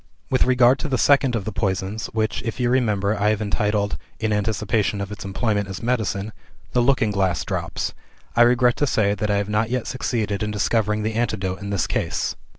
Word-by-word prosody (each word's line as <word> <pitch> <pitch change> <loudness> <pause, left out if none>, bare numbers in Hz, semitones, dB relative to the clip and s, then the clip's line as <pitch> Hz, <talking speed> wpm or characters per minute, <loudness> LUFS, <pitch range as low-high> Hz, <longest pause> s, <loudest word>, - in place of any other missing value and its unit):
"With 130 - +3
regard 125 +1 +4
to - - -3
the 130 - +1
second 135 -2 +4
of 105 -4 -2
the 110 - -3
poisons, 95 +1 -2
which 110 -1 -1
(if 115 +1 -5
you 120 -1 +1
remember) 105 -5 +1
I 105 - +4
have 110 -1 +1
entitled 105 -1 0 0.2
in 110 -1 0
anticipation 105 0 0
of 100 0 -4
its 105 - -7
employment 100 +1 -1
as 95 +1 -7
medicine 110 -4 -1 0.4
'The 125 - +2
Looking 120 -4 +2
Glass 95 -4 0
Drops,' - - -3 0.4
I 120 - +4
regret 120 0 +4
to 145 - +1
say 100 -5 +2
that 105 +1 -2
I 100 - +2
have 100 0 -1
not 105 +1 0
yet 125 -1 -1
succeeded 110 -5 -2
in 105 - -1
discovering 105 0 0
the 110 +1 -1
antidote 100 -5 -2
in 100 - -5
this 100 -3 0
case. - - -1
105 Hz, 205 wpm, -22 LUFS, 100-120 Hz, 0.4 s, regard